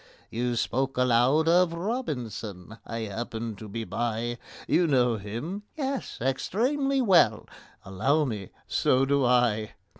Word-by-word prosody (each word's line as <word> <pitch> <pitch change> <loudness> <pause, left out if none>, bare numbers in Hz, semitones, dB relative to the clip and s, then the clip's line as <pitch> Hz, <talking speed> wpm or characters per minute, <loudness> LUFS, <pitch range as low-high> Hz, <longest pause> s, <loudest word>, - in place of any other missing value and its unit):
You 120 +1 -1
spoke 135 +3 -1
aloud 125 +5 +3
of 175 0 +4
ROBINSON—I 115 - -5
happened 110 0 -5
to 110 - -8
be 115 +3 -4
by. 120 +1 -2 0.3
You 175 -1 +3
know 125 -5 +3
him?" 120 - -5 0.2
"Yes, 275 -2 -3
extremely 260 - 0
well." 170 - +4 0.4
"Allow 130 +11 +1
me, 105 -7 -4 0.2
so 130 +1 +2
do 140 0 +2
I." 120 -4 +2
125 Hz, 120 wpm, -27 LUFS, 115-165 Hz, 0.4 s, of